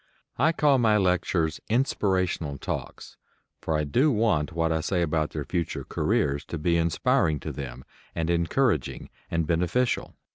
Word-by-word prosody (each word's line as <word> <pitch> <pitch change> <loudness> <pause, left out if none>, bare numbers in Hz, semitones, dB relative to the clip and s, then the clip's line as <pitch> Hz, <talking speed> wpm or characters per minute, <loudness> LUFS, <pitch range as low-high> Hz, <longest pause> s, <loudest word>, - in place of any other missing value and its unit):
I 155 +5 +4
call 145 -4 +3
my 110 -3 +4
lectures 90 -4 +1
"inspirational 95 - 0
talks," - - -6 0.4
for 80 - -1
I 75 - 0
do 130 - +2
want 105 - +1
what 80 0 0
I 80 0 0
say 90 +2 0
about 80 -1 0
their 75 -3 -5
future 85 -3 -2
careers 70 +1 0
to 85 - -5
be 85 +3 +1
inspiring 80 -2 +2
to - - -4
them, 65 -3 -7 0.3
and 80 -1 -1
encouraging 85 - 0 0.2
and 85 -1 0
beneficial. 90 +10 0
85 Hz, 150 wpm, -26 LUFS, 80-105 Hz, 0.4 s, I